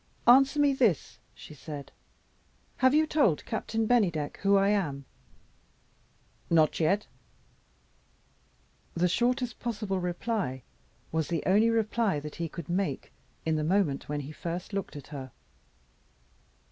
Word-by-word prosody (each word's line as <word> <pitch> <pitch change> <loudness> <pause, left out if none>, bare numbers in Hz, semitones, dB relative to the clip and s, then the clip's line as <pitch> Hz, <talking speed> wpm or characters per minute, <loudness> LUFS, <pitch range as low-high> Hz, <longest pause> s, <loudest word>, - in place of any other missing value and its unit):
"Answer 270 +4 +6
me 285 -1 +4
this," 230 - +1 0.2
she - - -12
said 145 -1 -8 0.9
"have 260 +2 +4
you 310 +1 +4
told 280 - +2
Captain 225 0 -2
Bennydeck 180 -11 +1
who 200 0 +3
I 195 0 +3
am?" 150 -10 -1 1.4
"Not 160 -3 +3
yet." 195 +6 +2 1.9
The 175 +1 +2
shortest 245 +4 0
possible 210 -5 -2
reply 175 - -2 0.5
was 160 -1 0
the 165 -3 -2
only 210 +5 +4
reply 220 -5 +1
that 150 +1 -8
he 170 -1 -3
could 160 0 -8
make, 175 -6 -2 0.3
in 160 -1 +1
the 155 - -1
moment 165 -5 0
when 145 0 -2
he 145 +2 -8
first 175 +5 -5
looked 195 -5 -3
at 145 -2 -9
her. 135 -2 -6
185 Hz, 130 wpm, -29 LUFS, 155-225 Hz, 1.9 s, Answer